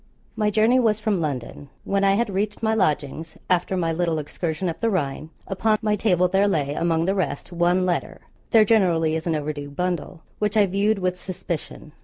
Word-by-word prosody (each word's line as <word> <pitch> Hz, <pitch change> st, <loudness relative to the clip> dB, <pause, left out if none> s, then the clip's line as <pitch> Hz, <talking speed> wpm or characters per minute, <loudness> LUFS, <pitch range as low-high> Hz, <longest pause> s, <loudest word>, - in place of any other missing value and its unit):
My 210 Hz, -1 st, +1 dB
journey 220 Hz, +4 st, +3 dB
was 220 Hz, -3 st, +2 dB
from 210 Hz, -4 st, 0 dB
London. 140 Hz, -1 st, -4 dB
When 200 Hz, 0 st, 0 dB
I 195 Hz, 0 st, +4 dB
had 225 Hz, -1 st, 0 dB
reached 205 Hz, +3 st, -2 dB
my 220 Hz, 0 st, +2 dB
lodgings, 160 Hz, -5 st, -1 dB
after 180 Hz, +1 st, +1 dB
my 165 Hz, -2 st, 0 dB
little 165 Hz, -1 st, 0 dB
excursion 160 Hz, +3 st, -3 dB
up 165 Hz, -, -3 dB
the 230 Hz, -, +1 dB
Rhine, 155 Hz, -5 st, -2 dB, 0.2 s
upon 215 Hz, +3 st, +1 dB
my 210 Hz, -1 st, +2 dB
table 180 Hz, -4 st, +2 dB
there 195 Hz, +3 st, +2 dB
lay, 145 Hz, -7 st, 0 dB
among 165 Hz, +1 st, +1 dB
the 190 Hz, -, +1 dB
rest, 185 Hz, -5 st, -3 dB
one 175 Hz, +2 st, +2 dB
letter 180 Hz, -1 st, -2 dB, 0.3 s
there 220 Hz, -3 st, +6 dB
generally 170 Hz, -7 st, +3 dB
is 160 Hz, +2 st, -3 dB
in 165 Hz, -, +1 dB
an 150 Hz, -, -1 dB
overdue 145 Hz, -1 st, -5 dB
bundle 175 Hz, +1 st, -3 dB, 0.2 s
which 210 Hz, 0 st, 0 dB
I 210 Hz, -, +6 dB
viewed 200 Hz, +3 st, +1 dB
with 180 Hz, -1 st, -2 dB
suspicion. 170 Hz, -4 st, -6 dB
180 Hz, 200 wpm, -23 LUFS, 160-205 Hz, 0.3 s, there